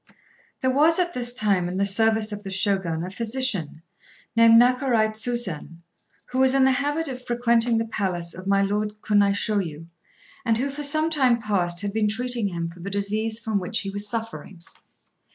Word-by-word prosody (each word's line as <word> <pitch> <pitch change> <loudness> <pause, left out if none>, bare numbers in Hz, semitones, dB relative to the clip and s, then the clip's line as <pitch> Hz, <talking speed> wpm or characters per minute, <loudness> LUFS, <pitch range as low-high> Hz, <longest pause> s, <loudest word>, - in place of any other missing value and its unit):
"] - - -34
There 260 - +1
was 310 +5 +4
at 350 -1 0
this 245 -1 -1
time 205 -7 0
in 180 - -4
the 200 - +1
service 220 +2 +2
of 205 0 -7
the 195 - -7
Shogun 190 -4 -1
a 185 - -6
physician, 220 - 0 0.5
named 230 0 +6
Nakarai 245 -3 +3
Tsusen, 215 -7 -4 0.5
who 255 - -1
was 265 0 +5
in 270 - +4
the 265 - +4
habit 290 +5 -1
of 255 -1 -7
frequenting 235 -1 +1
the 225 - 0
palace 180 -6 -2
of 185 +2 -9
my 200 0 +3
Lord 210 +1 -2
Kunaishôyu, 200 -5 0 0.6
and 230 -3 +1
who 275 +4 -2
for 290 +2 -7
some 310 +3 +2
time 260 -6 +2
past 180 -5 0
had 200 -1 -4
been 215 -1 +1
treating 235 0 -1
him 170 -3 -4
for 175 - -15
the 185 +3 -6
disease 210 +3 -2
from 220 -3 -2
which 205 +4 -2
he 195 - -5
was 205 +1 -3
suffering. 225 -6 -6
220 Hz, 190 wpm, -24 LUFS, 195-245 Hz, 0.6 s, named